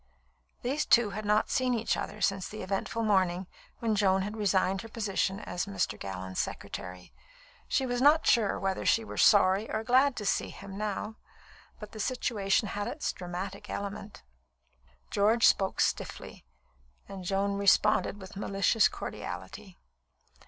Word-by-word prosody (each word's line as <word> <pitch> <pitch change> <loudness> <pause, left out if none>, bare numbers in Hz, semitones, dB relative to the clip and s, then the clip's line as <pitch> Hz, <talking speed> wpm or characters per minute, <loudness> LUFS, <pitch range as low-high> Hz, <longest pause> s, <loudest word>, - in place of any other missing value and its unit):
These 280 +5 -1
two 235 -4 +5
had 215 +2 -5
not 210 +1 +2
seen 255 -1 +1
each 225 0 0
other - - -5
since 195 -2 0
the 215 -1 -7
eventful 195 +4 -2
morning 190 -3 +2 0.3
when 225 -2 0
Joan 190 -2 +3
had 210 +2 -5
resigned 195 -2 +1
her 225 - -10
position 200 -3 -1
as 180 +3 -4
Mr. 200 - -1
Gallon's 95 -1 -5
secretary. 90 0 -6 0.5
She 265 - +1
was 245 -1 -1
not 300 +4 +5
sure 220 -5 +3
whether 190 -1 -2
she 225 - +3
were - - -7
sorry 200 +1 +5
or 220 - -2
glad 260 +3 +4
to 210 - -5
see - - 0
him 195 -1 -10
now, 210 +1 -4 0.6
but 210 -1 -9
the 215 - -10
situation 210 -3 0
had 205 +1 -3
its 300 - -3
dramatic 185 +2 -6
element. 200 0 -6 0.9
George 215 +3 +3
spoke 190 -1 +3
stiffly, - - -2 0.6
and 195 -2 -8
Joan 200 +2 0
responded 200 +1 +3
with 190 +1 -11
malicious 200 +2 +2
cordiality. 200 -4 -7
200 Hz, 150 wpm, -29 LUFS, 190-225 Hz, 0.9 s, two